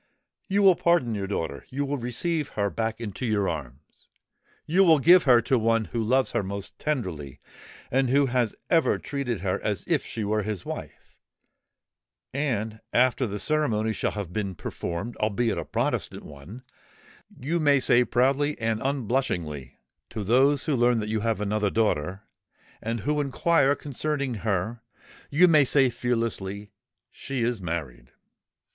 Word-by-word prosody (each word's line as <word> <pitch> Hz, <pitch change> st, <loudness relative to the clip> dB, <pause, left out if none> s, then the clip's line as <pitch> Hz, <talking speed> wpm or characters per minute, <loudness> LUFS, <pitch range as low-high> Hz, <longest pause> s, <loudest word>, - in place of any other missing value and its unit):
You 200 Hz, +1 st, +2 dB
will 190 Hz, -2 st, +7 dB
pardon 170 Hz, -10 st, +2 dB
your 100 Hz, -2 st, -3 dB
daughter—you 100 Hz, -, -3 dB
will 140 Hz, 0 st, -2 dB
receive 145 Hz, +6 st, -2 dB
her 100 Hz, -1 st, +1 dB
back 115 Hz, 0 st, -2 dB
into 110 Hz, +1 st, -6 dB
your 105 Hz, -5 st, +1 dB
arms,—you 75 Hz, -, -4 dB
will 165 Hz, -4 st, +6 dB
give 175 Hz, +5 st, +6 dB
her 120 Hz, -4 st, +6 dB
to 125 Hz, +1 st, +2 dB
one 115 Hz, 0 st, +2 dB
who 115 Hz, -, 0 dB
loves 130 Hz, +4 st, +2 dB
her -, -, 0 dB
most 100 Hz, 0 st, -7 dB
tenderly 90 Hz, -, -3 dB, 0.5 s
and 130 Hz, 0 st, +2 dB
who 140 Hz, +2 st, +4 dB
has 125 Hz, -4 st, 0 dB, 0.2 s
ever 165 Hz, -1 st, +3 dB
treated 135 Hz, -6 st, -3 dB
her -, -, -1 dB
as -, -, -1 dB
if -, -, +1 dB
she 110 Hz, -, -5 dB
were 105 Hz, +1 st, 0 dB
his 105 Hz, -3 st, -4 dB
wife—and, 115 Hz, -6 st, -7 dB
after 130 Hz, +1 st, +2 dB
the 105 Hz, 0 st, -4 dB
ceremony 110 Hz, -4 st, 0 dB
shall -, -, -2 dB
have 100 Hz, -5 st, -5 dB
been 100 Hz, -3 st, -3 dB
performed, 85 Hz, +8 st, -5 dB
albeit 110 Hz, +2 st, 0 dB
a -, -, -5 dB
Protestant -, -, -2 dB
one, 75 Hz, -, -11 dB, 0.8 s
you 160 Hz, +7 st, -1 dB
may 145 Hz, -3 st, +4 dB
say 125 Hz, -1 st, +4 dB
proudly 135 Hz, +5 st, +1 dB
and 110 Hz, -1 st, -1 dB
unblushingly 115 Hz, -, -2 dB, 0.3 s
to 110 Hz, -, -5 dB
those 130 Hz, +6 st, +3 dB
who 150 Hz, -, +1 dB
learn 120 Hz, -1 st, +3 dB
that 105 Hz, 0 st, -3 dB
you 110 Hz, 0 st, 0 dB
have 115 Hz, 0 st, -1 dB
another 105 Hz, 0 st, 0 dB
daughter, 95 Hz, -3 st, 0 dB, 0.6 s
and 115 Hz, 0 st, -3 dB
who 150 Hz, +5 st, 0 dB
inquire 145 Hz, 0 st, +2 dB
concerning 145 Hz, -1 st, -3 dB
her,—you 115 Hz, -, -1 dB
may 155 Hz, -4 st, +6 dB
say 135 Hz, -1 st, +3 dB
fearlessly, 105 Hz, -5 st, -3 dB, 0.4 s
'She 135 Hz, -3 st, -4 dB
is 120 Hz, -3 st, -1 dB
married!'" 75 Hz, -9 st, -5 dB
115 Hz, 150 wpm, -26 LUFS, 105-140 Hz, 0.8 s, will